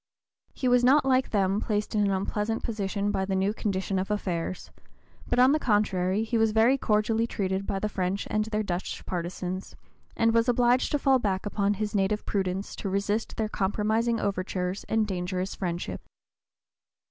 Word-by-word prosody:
He 260 - -1
was 245 0 +4
not, 270 +3 +5
like 260 -1 +2
them, 200 0 +1
placed 210 -1 -1
in 210 - +2
an 200 - +2
unpleasant 210 +3 -1
position 205 -2 -2
by 190 - 0
the 190 0 -1
new 195 +2 +1
condition 195 -3 -1
of 190 - -3
affairs, 185 -4 -3 0.6
but 245 - +1
on 255 +2 +6
the 305 - +2
contrary 205 -4 +1
he 225 +1 0
was 225 -1 +3
very 225 +4 +5
cordially 220 -1 +1
treated 195 -3 -2
by 195 - -1
the 210 - -1
French 195 -1 -2
and 215 0 +1
their 215 -1 -1
Dutch 180 -2 -4
partisans, 180 +1 -4 0.4
and 230 0 +3
was 230 +1 +3
obliged 245 +1 +3
to - - +4
fall 270 -2 +3
back 195 -4 -1
upon 205 0 0
his 210 +1 -3
native 205 +1 0
prudence 190 0 -2
to 200 - -3
resist 205 +3 -1
their 220 - 0
compromising 220 +3 0
overtures 185 -1 -2
and 220 -1 +1
dangerous 185 -1 -3
friendship. 175 -2 -4
205 Hz, 175 wpm, -27 LUFS, 190-225 Hz, 0.6 s, on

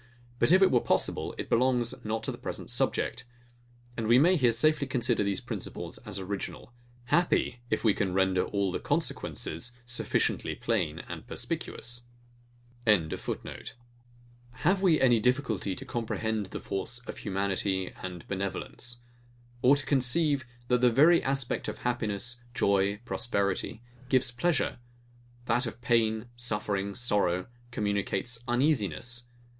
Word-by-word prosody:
But - - +4
if 190 +2 +7
it 190 - +5
were 125 - +5
possible, - - 0
it - - -4
belongs 125 -1 +2
not 110 +1 -2
to - - -1
the - - -9
present - - -6
subject; - - 0 0.7
and 115 -2 -2
we 120 +2 +6
may 175 +7 +6
here 125 -8 +4
safely 155 +3 +3
consider 125 -4 +1
these 100 -2 -1
principles - - -5
as 105 -2 -6
original; 100 +5 -5 0.3
happy, 170 -5 +2
if - - 0
we 110 -3 +5
can 95 -2 -1
render 95 0 +2
all 100 -2 0
the - - -2
consequences 85 +10 -2
sufficiently 120 0 0
plain - - -1
and - - -7
perspicuous!] 120 0 -4 0.8
Have 120 - -2
we 175 -5 +4
any 120 -3 +5
difficulty 115 -6 0
to 135 - -8
comprehend 110 -4 -2
the - - -6
force 100 +5 -3
of - - -7
humanity 95 -1 -1
and 90 -2 -7
benevolence? 100 +5 -4 0.6
Or 135 +3 +6
to 145 0 -4
conceive, 140 +1 +2 0.2
that 125 0 +2
the 125 - +6
very 155 +8 +6
aspect 135 -2 0
of - - -4
happiness, 120 0 -2
joy, 100 -1 +2
prosperity, 100 0 -1 0.3
gives 130 -2 +3
pleasure; 140 +1 0 0.7
that 120 +2 +1
of 115 - -7
pain, 115 -2 +2
suffering, 105 -4 -1
sorrow, 100 -6 +1 0.2
communicates 105 +1 -1
uneasiness? 120 - +1
120 Hz, 135 wpm, -29 LUFS, 100-125 Hz, 0.8 s, if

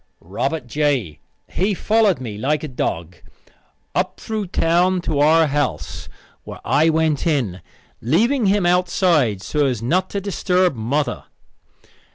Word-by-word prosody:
Robert 135 - -3
J., 130 - -1 0.3
he 195 +2 -1
followed 210 - +2
me 115 -5 -6
like 145 +8 -1
a - - -3
dog, 85 - -4 0.8
up - - -1
through 215 -3 -4
town 175 +2 +2
to 155 -4 -2
our 160 +2 +5
house, 135 - -3 0.3
where - - -9
I 160 +2 +3
went 160 -1 +1
in, 120 - -1 0.4
leaving 220 - +2
him 195 -1 +2
outside 175 - +2
so 150 -2 0
as 120 -4 -2
not 180 +9 +1
to 200 - -3
disturb 185 -3 +1
mother. 135 +6 -2
155 Hz, 135 wpm, -20 LUFS, 125-180 Hz, 0.8 s, our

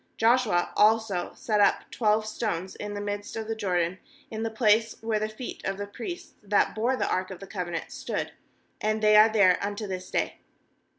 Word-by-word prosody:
9Joshua 225 -6 +3
also 215 -4 +3
set 210 -2 0
up 200 - +3
twelve 215 -1 +2
stones 200 -5 -3
in 205 0 -6
the - - -3
midst 205 0 -4
of 220 -1 -4
the 225 - -1
Jordan, 180 -3 -1 0.3
in 220 0 -4
the 225 - -1
place 220 0 +2
where 220 -1 0
the 215 0 -2
feet 215 +3 -8
of 195 0 -2
the 205 - -4
priests 345 - -7
that 205 -1 +2
bore 235 +4 +1
the - - -1
ark 185 0 -1
of 190 -2 -8
the 195 - -8
covenant 175 -4 -4
stood; - - -4 0.5
and 215 0 0
they 210 0 +6
are 215 +1 +8
there 200 -5 +4
unto 205 +1 -3
this 185 -1 -5
day. - - -1
210 Hz, 195 wpm, -27 LUFS, 195-220 Hz, 0.5 s, are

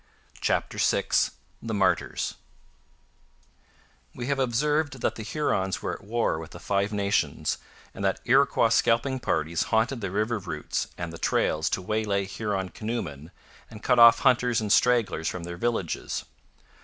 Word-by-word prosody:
CHAPTER - - -1
VI - - +1 0.5
THE 115 -1 -3
MARTYRS - - 0 1.8
We 120 - -5
have 140 +1 -1
observed 140 +2 0
that - - +1
the - - -8
Hurons 105 -6 -1
were - - -2
at - - -9
war 110 -6 0
with 80 - -8
the - - -11
Five 100 +1 0
Nations 100 -1 0 0.3
and 100 - -7
that 95 -1 +1
Iroquois 130 -2 +4
scalping 115 +4 +2
parties 80 -6 0
haunted 115 +3 +1
the 100 - -2
river 110 +4 -1
routes 85 -6 -3
and 85 -1 -5
the 85 - -9
trails 80 +1 +1
to 95 - -2
waylay 105 -1 0
Huron 100 -1 -3
canoemen 90 -10 -5 0.4
and 110 -1 -12
cut 125 -2 +3
off 115 -1 +8
hunters 125 -1 +3
and 105 -2 -2
stragglers 115 -10 +2
from 90 0 -3
their 85 0 -6
villages. 115 -5 -2
110 Hz, 150 wpm, -26 LUFS, 95-120 Hz, 1.8 s, off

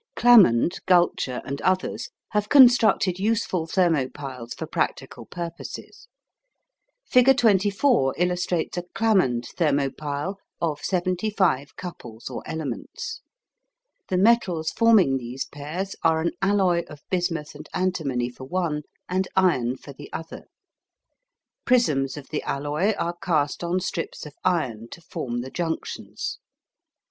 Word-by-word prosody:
Clammond, 190 - +6
Gulcher, 175 -8 +2
and 140 +1 -5
others 185 0 0 0.2
have 210 -1 -1
constructed 240 -8 +6
useful 200 -5 0
thermo 165 -7 +2
piles 130 -5 -8
for - - -5
practical - - -3
purposes. 170 -1 -8 1.0
Figure 255 +2 +5
24 205 - +3
illustrates 180 -1 -1
a - - -6
Clammond 185 - +2
thermo 145 -5 +2
pile 150 +7 -4 0.2
of 155 -3 -1
75 185 -4 0
couples 120 -11 -8
or - - -5
elements. 275 - -5 0.9
The 185 - 0
metals 185 -6 +3
forming 215 - +5
these 125 +1 -5
pairs 160 +7 -5
are 160 -1 +3
an 170 +1 0
alloy 195 -3 +3
of 150 -2 -12
bismuth 175 -4 -1
and - - -11
antimony 140 -10 -1
for 130 +2 -10
one 165 -1 -1 0.3
and 185 +1 0
iron 130 -10 +2
for 140 - -11
the 145 +2 -12
other. 160 0 -7 1.2
Prisms 150 - +2
of 140 - -9
the 155 - -2
alloy 150 +9 -1
are 170 +1 -2
cast 155 -2 0
on 175 +2 0
strips 170 -3 -4
of 150 - -10
iron 125 -11 -1
to - - -11
form 125 -8 -4
the 130 +2 -8
junctions. 165 -2 -4
170 Hz, 125 wpm, -24 LUFS, 145-190 Hz, 1.2 s, Clammond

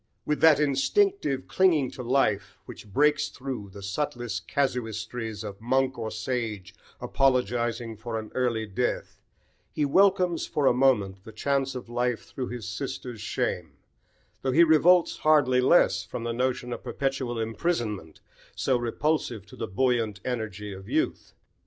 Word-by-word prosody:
With 150 - -1
that 160 -3 +7
instinctive 150 - +1
clinging 165 -8 +3
to - - -8
life, 105 -7 0
which 105 - -11
breaks 150 +6 +3
through 125 -6 -6
the 100 0 -10
subtlest 115 - -3
casuistries 115 -4 -2
of 100 -1 -8
monk 130 +2 +1
or 110 -1 -3
sage 110 -7 -4 0.3
apologising 120 -3 0
for 115 +1 -4
an 110 -1 -6
early 120 -3 0
death, 95 -3 -3 0.5
he 150 - 0
welcomes 185 +2 +3
for 150 - -1
a 130 - +5
moment 105 -8 +2
the 110 - -10
chance 135 +4 -1
of 125 - -6
life 120 0 -1
through 130 -3 -5
his 120 -3 -6
sister's 120 0 -5
shame, - - -2 0.7
though 130 - 0
he 170 - +7
revolts 170 +2 +5
hardly 145 -5 +4
less 150 +7 +4
from 115 - -6
the 120 0 -2
notion 125 0 -1
of - - -7
perpetual 135 -3 -2
imprisonment 110 - -2 0.3
so 130 -2 +1
repulsive 120 -2 -1
to 100 - -14
the - - -4
buoyant 115 -1 0
energy 105 -5 -4
of 95 +1 -11
youth. - - -1
125 Hz, 145 wpm, -27 LUFS, 110-135 Hz, 0.7 s, that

